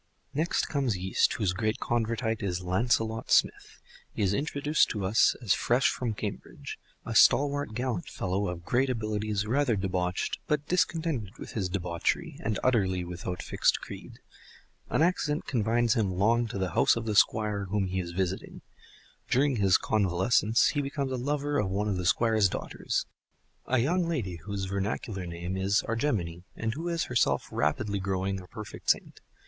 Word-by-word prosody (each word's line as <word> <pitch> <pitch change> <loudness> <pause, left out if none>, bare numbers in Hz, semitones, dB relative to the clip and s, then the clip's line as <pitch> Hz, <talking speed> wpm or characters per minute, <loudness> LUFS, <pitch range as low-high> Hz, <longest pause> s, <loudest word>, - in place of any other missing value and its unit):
Next 155 +4 +1
comes 135 - 0
Yeast, 95 +1 +1
whose 100 -6 0
great 110 +2 -1
Convertite 115 -1 -1
is 90 -2 -2
Lancelot 110 +4 0
Smith. - - +2 0.3
He - - -2
is 95 0 +2
introduced 145 +4 +1
to 105 -3 -3
us 100 +4 +4
as 105 - +3
fresh 125 +3 +2
from 115 -4 -3
Cambridge, 105 -1 -6 0.3
a - - -4
stalwart 145 -4 +4
gallant 120 -6 -2
fellow 95 +2 -2
of 85 -1 -5
great 130 +2 +2
abilities, 110 -3 -1
rather 125 +1 +2
debauched, 90 -2 -1
but 150 -2 0
discontented 160 - -1
with - - -8
his 95 -5 -2
debauchery, 90 -3 -2
and 110 -2 0
utterly 95 -8 +2
without 90 +1 -5
fixed - - +2
creed. - - -10 0.7
An - - +2
accident 155 -4 0
confines 120 -1 +2
him 105 -7 0
long 115 +5 +2
to 110 - -5
the 95 -2 -1
house - - +4
of 115 -1 -3
the 110 - -1
Squire 105 -1 +2
whom 100 +1 0
he 95 0 -2
is 90 -2 -4
visiting. 95 +1 -3 0.7
During 135 0 +2
his 95 -3 +4
convalescence 105 +3 +2
he 145 - 0
becomes 140 -1 -3
a - - 0
lover 145 +3 -1
of 95 - 0
one 100 +3 -1
of 100 -3 0
the 90 -1 -1
Squire's 110 -1 +3
daughters—a 130 - -4
young 170 +8 +1
lady 105 - -2
whose 100 +2 -4
vernacular 100 -1 -3
name 85 +2 -4
is 95 +2 +1
Argemone, 105 - -1
and 115 0 -2
who 165 +4 -4
is 170 -1 0
herself 120 -2 +1
rapidly 100 +8 0
growing 95 0 -2
a 90 - -13
perfect 110 +1 -7
saint. - - 0
110 Hz, 165 wpm, -28 LUFS, 95-125 Hz, 0.7 s, us